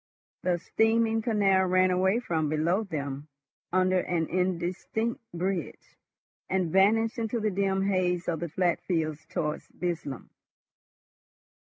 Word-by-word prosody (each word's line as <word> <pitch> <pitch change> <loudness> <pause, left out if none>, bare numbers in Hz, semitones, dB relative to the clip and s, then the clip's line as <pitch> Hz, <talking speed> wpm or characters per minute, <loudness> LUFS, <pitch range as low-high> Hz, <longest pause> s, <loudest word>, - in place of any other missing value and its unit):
The 180 -1 +1
steaming 225 +4 +2
canal 200 -4 +3
ran 185 0 +3
away 190 +5 +2
from 160 -10 -1
below 165 +6 +1
them 145 -6 -5 0.4
under 185 0 +3
an 175 -2 0
indistinct 185 +5 -1
bridge, 175 -1 -4 0.5
and 185 -3 0
vanished 225 +6 +3
into 230 +1 -1
the 215 -1 0
dim 195 0 +1
haze 180 -3 0
of 165 -2 -1
the 170 0 -4
flat 175 +2 +1
fields 155 -4 -2
towards 150 -1 -3
Burslem. 165 -7 -5
185 Hz, 120 wpm, -28 LUFS, 170-200 Hz, 0.5 s, canal